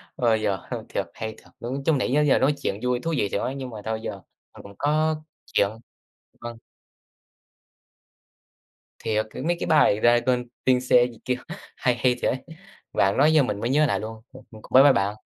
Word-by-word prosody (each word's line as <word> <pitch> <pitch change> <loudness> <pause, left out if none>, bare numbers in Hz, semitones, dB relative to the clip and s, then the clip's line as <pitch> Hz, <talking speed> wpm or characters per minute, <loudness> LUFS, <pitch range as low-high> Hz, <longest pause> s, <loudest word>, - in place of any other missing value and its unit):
Ơ, 120 -4 +2
giờ 105 -3 0
hư - - -1
thiệt - - -2
hay 110 - -5
thiệt, - - -19
ứ, 120 +2 -5
chứ 160 - +4
nãy 130 -3 0
giơ 150 - +4
giờ 145 -2 +3
nói 145 +2 +3
chuyện 100 - -2
vui, 125 0 +1
thú 165 +6 -3
vị 100 - 0
thiệt - - -1
ấy, 130 - -3
nhưng 130 -2 -6
mà 110 -3 -8
thôi 110 0 -3
giờ - - -4 0.4
mình - - -13
cũng 100 0 -13
có 155 +2 +1 0.3
chuyện. 100 - +1 0.7
Vâng. 120 -1 -7 2.4
Thiệt, 110 0 -1
c - - -17
mấy 175 +1 +1
cái - - -3
bài 150 -9 +4
"Dragostea 120 +1 +3 0.2
Din 130 -1 +4
Tei" 120 0 +6
gì 115 - -15
kia 125 - +1 0.4
hay 125 -1 +1
hay 125 0 +2
thiệt - - +2
ấy, 130 - -2 0.6
bạn 100 0 +2
nói 150 +3 +5
giờ 150 -3 +5
mình 105 -5 -3
mới 115 - -2
nhớ 150 +3 +4
lại - - 0
luôn. 110 +1 -7
Ừm, 130 -1 -13
ừm, 110 -1 -13
cũng - - -16
bye 130 +2 +9
bye 140 -2 +7
bạn. 100 +2 -1
125 Hz, 215 wpm, -24 LUFS, 110-135 Hz, 2.4 s, bye